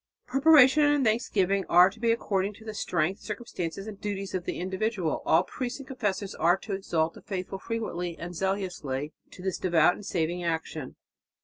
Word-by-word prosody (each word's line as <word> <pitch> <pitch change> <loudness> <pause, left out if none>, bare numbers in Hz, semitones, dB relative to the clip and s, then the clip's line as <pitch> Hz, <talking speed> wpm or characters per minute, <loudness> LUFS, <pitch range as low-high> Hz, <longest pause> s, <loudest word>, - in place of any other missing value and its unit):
Preparation 275 0 +6
and 290 -2 +3
thanksgiving 200 -4 +1
are 180 +1 +8
to 215 - -16
be 230 0 +2
according 200 -3 -1
to 220 - -15
the 215 - -5
strength, 185 -1 -1
circumstances 195 -5 -5
and 210 -2 -9
duties 200 -2 -4
of 180 -2 -2
the - - -3
individual. 190 -1 -1
All 165 +3 +5
priests 250 +5 -4
and 275 -2 -10
confessors 205 -7 -2
are 175 +2 +3
to 200 - -6
exhort 165 -4 0
the - - -13
faithful 190 0 -5
frequently 180 -7 -4
and 175 +1 -6
zealously 180 -7 -2 0.2
to 180 - -12
"this 190 -2 -2
devout 175 -1 +4
and 205 - -10
saving 175 -1 -1
action." 160 -4 -3
195 Hz, 180 wpm, -28 LUFS, 175-220 Hz, 0.2 s, are